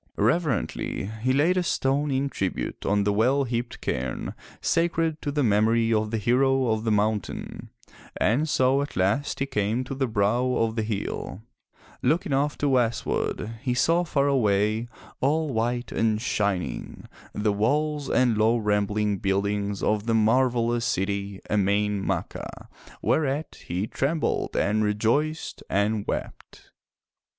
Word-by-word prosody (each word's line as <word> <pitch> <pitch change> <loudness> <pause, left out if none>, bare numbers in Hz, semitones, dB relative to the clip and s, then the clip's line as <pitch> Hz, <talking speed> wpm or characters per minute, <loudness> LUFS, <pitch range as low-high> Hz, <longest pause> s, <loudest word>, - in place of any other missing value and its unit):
Reverently 125 - 0 0.2
he 130 +3 +2
laid 155 +7 +3
a - - +3
stone 145 -3 0
in 135 +1 0
tribute 95 -8 -3
on 100 0 +2
the 105 0 +1
well 130 +7 +3
heaped 120 -1 -3
cairni 65 0 -3 0.3
sacred 165 -2 0
to 145 - -2
the 145 0 0
memory 115 +1 +3
of 110 0 +1
the 115 - -1
hero 130 +3 +2
of 110 +1 -1
the 110 - +1
mountain, 105 -1 -2 0.5
and 130 +11 +2
so 130 0 +3
at 145 - -5
last 100 +10 +1
he 135 - 0
came 115 -2 -1
to 130 - -6
the 135 -1 -1
brow 120 +4 +1
of 115 -2 0
the 110 - 0
hill. 105 -1 -4 0.6
Looking 160 +4 +1
off 145 +2 +1
to 145 - +1
westward, 115 -2 -1
he 125 -3 -1
saw 165 +6 +3
far 140 -4 +1
away, 110 -3 +2 0.3
all 150 +1 +1
white 120 +2 -1
and 110 -1 +1
shining, 100 -5 -2 0.3
the 105 0 0
walls 145 +7 0
and 125 -3 +3
low 110 +2 +4
rambling 105 -1 0
buildings 100 +1 -1
of 105 +1 0
the 115 - +2
marvelous 120 +1 +2
city, 100 -2 -2
Emain 105 0 +1
Macha, - - -4 0.3
whereat 150 0 0
he 90 +4 -1
trembled 145 +7 -1
and 110 +1 +2
rejoiced 115 +10 0
and 100 +1 0
wept. - - -6
115 Hz, 140 wpm, -25 LUFS, 105-135 Hz, 0.6 s, low